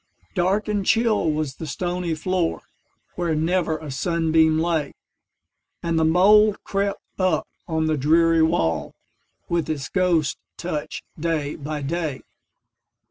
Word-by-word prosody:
Dark 195 +4 +1
and 205 -2 0
chill 220 -5 +2
was 150 -3 -3
the 160 - -6
stony 175 +2 -2
floor, 175 +1 -1 0.5
Where 170 -3 -1
never 165 0 +1
a 155 -2 -8
sunbeam 160 +1 +2
lay, 160 -3 0 0.9
And 165 -1 +1
the - - +3
mould 200 +6 +5
crept 200 0 -2 0.2
up 185 -1 +1 0.2
on 160 -2 0
the 155 -1 +1
dreary 165 +3 +4
wall, 80 - +1 0.5
With 170 -2 -1
its 145 -5 -3
ghost 170 - +1 0.2
touch, 155 -4 -4 0.2
day 155 -3 -1
by 150 0 -5
day. 155 -2 -3
165 Hz, 130 wpm, -23 LUFS, 155-180 Hz, 0.9 s, mould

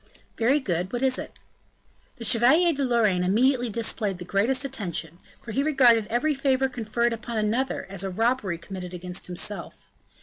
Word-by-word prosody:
"Very 255 +6 +2
good, 180 - -2
what 245 +1 -2
is 260 -1 +1
it?" - - -7 0.8
The 235 -4 -6
Chevalier 305 - +4
de 280 -1 -2
Lorraine 220 -8 +2
immediately 245 +6 +2
displayed 215 -3 -1
the 175 - -8
greatest 240 +9 +1
attention, 175 - -3 0.2
for 230 - -7
he 270 - 0
regarded 250 -7 +4
every 270 +7 +1
favor 270 -1 +1
conferred 235 -1 -1
upon 230 0 -5
another 225 +5 -1
as 195 -1 -4
a 195 - -2
robbery 220 -2 0
committed 180 0 -8
against 180 0 -5
himself. 180 +3 -5
230 Hz, 165 wpm, -25 LUFS, 195-260 Hz, 0.8 s, Chevalier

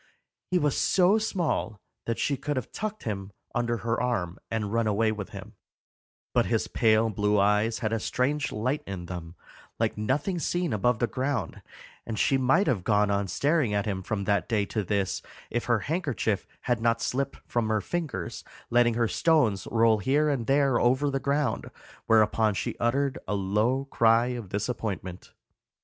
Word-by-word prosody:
He 180 - +2
was 150 -4 +1
so 190 +3 +4
small 170 - -1 0.3
that 115 - -1
she 140 - 0
could 145 +2 -3
have 125 - -4
tucked 215 0 -4
him 100 -3 -4 0.2
under 120 -1 0
her 115 0 0
arm 100 -8 -1
and 110 -2 -2
run 115 -1 +2
away 110 +1 +2
with 105 -2 -5
him, - - -9 0.8
but - - +3
his - - 0
pale 110 0 +3
blue 105 0 +1
eyes 105 +3 +2
had 110 - 0
a 115 - +1
strange 140 +6 -1
light 130 +7 -1
in 95 -3 -5
them, 85 -1 -7 0.4
like - - -1
nothing 145 - 0
seen 175 0 -1
above 115 +3 +2
the 120 - +1
ground, 130 - -2 0.4
and 115 -2 -5
she 135 - +3
might 135 +10 +3
have 105 - 0
gone 105 -1 +2
on 100 0 0
staring 140 - +1
at 100 - 0
him 95 -3 -2
from 100 +1 -3
that 100 +2 0
day 105 -4 +1
to 110 +1 -2
this 100 0 -1 0.3
if 120 - -1
her 120 -3 +2
handkerchief 145 - -1
had 120 -2 0
not 115 0 +2
slipped 140 +1 -1
from 120 -2 -1
her 110 -1 +2
fingers, 125 - -4 0.3
letting 120 -1 +4
her 115 -1 +2
stones 115 - +2
roll 115 -1 +4
here 145 +8 +2
and 130 -6 -1
there 135 -2 +3
over 130 +4 +2
the 135 - -1
ground, 140 -3 -1 0.4
whereupon 110 -1 +3
she - - -2
uttered 135 +3 0
a 105 - 0
low 105 +7 +1
cry 115 -2 +3
of 120 -6 -5
disappointment. 100 -4 -4
115 Hz, 175 wpm, -27 LUFS, 105-135 Hz, 0.8 s, so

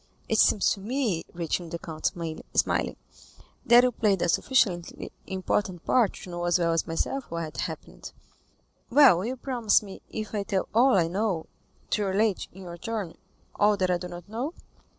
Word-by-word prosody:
"It 220 - +1
seems 205 - +4
to - - -2
me," 220 -4 -1
returned 170 0 -3
the - - -1
count, 160 -2 -3 0.5
smiling, - - +1 0.7
"that 240 +1 +8
you 250 - +3
played 210 -5 +1
a 175 - +1
sufficiently 185 -7 +1 0.2
important 190 -1 -2
part 235 -6 +3
to 180 - -10
know 175 0 -3
as 175 +1 +3
well 170 -1 +1
as 165 - 0
myself 250 +11 -2
what 165 -2 -5
happened." - - -6 0.8
20249m 240 - -11
"Well, 250 -12 +7
you 245 +4 -2
promise 240 -5 +2
me, 195 -2 -10
if 215 0 -5
I 210 - 0
tell 195 -1 -1
all 250 +4 +5
I 170 -3 +3
know, 185 -2 -1 0.5
to 210 - +1
relate, 200 +1 +1
in 190 +1 -12
your 170 -1 -9
turn, 210 -4 -4 0.4
all 210 0 +3
that 185 -1 +1
I 175 - +1
do 180 - -6
not 175 0 -9
know?" 245 - -4
195 Hz, 180 wpm, -27 LUFS, 175-225 Hz, 0.8 s, that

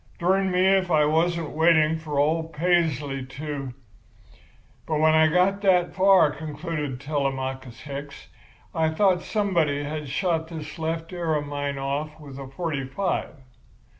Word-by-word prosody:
'Durn 190 +2 +2
me 180 0 +2
if 190 -1 +3
I 155 -3 +4
wasn't 165 +1 +1
waiting 160 0 +4
for 150 -3 -5
old 160 +3 +1
Paisley 150 -5 +1
to—' 135 -1 -6 1.1
"But 155 -2 0
when 155 0 +4
I 160 0 +5
got 180 +5 +2
that 180 -3 +3
far," 190 -5 +5
concluded 150 -3 -5
Telemachus 130 -4 -3
Hicks, 140 +1 -8 0.5
"I 160 -1 +1
thought 180 +2 +2
somebody 170 -9 0
had 150 -1 -5
shot 165 +2 0
this 160 0 -8
left 165 +2 -3
ear 170 -3 -1
of 145 -1 -1
mine 145 -1 -3
off 145 +3 -3
with 140 -3 -10
a 135 - -7
forty 145 0 -3
five. 185 +8 -2
155 Hz, 145 wpm, -25 LUFS, 145-175 Hz, 1.1 s, I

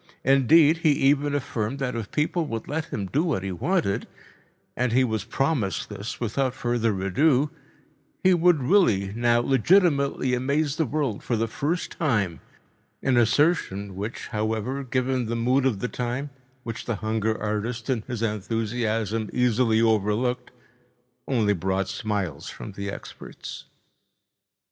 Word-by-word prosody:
Indeed, 145 +4 +5
he 160 -2 +3
even 145 +1 +2
affirmed 125 -3 -2
that 125 -3 -2
if 115 -3 -4
people 155 +2 0
would 115 -4 -5
let 155 +2 -2
him 100 - -4
do 140 - 0
what 155 - -1
he 95 - -3
wanted—and 125 - -3
he 130 +3 +4
was 110 -4 -1
promised 135 -8 -1
this 105 +2 -6
without 125 +3 -1
further 115 -5 0
ado—he 150 - 0
would 175 -4 +3
really 115 - +3
now 120 +1 +2
legitimately 140 - +3
amaze 140 +4 0
the 160 - +1
world 140 -6 -1
for 120 - -1
the 115 - +1
first 155 +10 -2
time, 105 - 0 0.6
an 135 -1 +2
assertion 115 - +2
which, 105 +5 -5
however, 110 +5 -2
given 130 -1 -1
the 115 - -2
mood 125 +3 +2
of 105 -7 -1
the - - 0
time, 125 +4 -3 0.3
which 115 -2 -6
the 115 - -1
hunger 110 +1 -1
artist 110 +2 -3
in 130 -5 0
his 120 -3 -3
enthusiasm 110 0 -1
easily 120 -2 +2
overlooked, 110 +3 +1 0.8
only 110 -6 +2
brought 95 +1 -1
smiles 100 -6 -3
from - - -8
the 100 0 -5
experts. - - -9
120 Hz, 140 wpm, -25 LUFS, 105-140 Hz, 0.8 s, Indeed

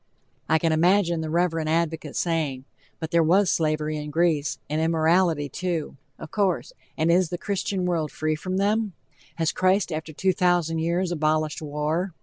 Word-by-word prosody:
I 160 - +5
can 165 0 +1
imagine 170 +1 +3
the 160 - -4
reverend 165 -1 0
advocate 160 -2 -1
saying: 150 -6 -1 0.3
"But 160 -1 -5
there 170 - +4
was 180 +4 +3
slavery 155 -1 0
in 150 0 -5
Greece, 160 -2 +1
and 155 +2 -1
immorality, 160 -1 +2
too," 170 +1 -3 0.2
of 160 - -10
course, 205 - 0 0.2
and 160 +1 +2
is 175 -1 +3
the 175 - -3
Christian 195 -1 -2
world 165 -4 -1
free 155 0 -1
from 185 +4 -3
them? 210 +1 +1 0.4
Has 165 -2 0
Christ 185 0 +1
after 155 0 -4
two 190 +5 +1
thousand 175 -3 +1
years 170 +2 0
abolished 155 -1 0
war? 155 +4 -2
165 Hz, 165 wpm, -25 LUFS, 155-180 Hz, 0.4 s, I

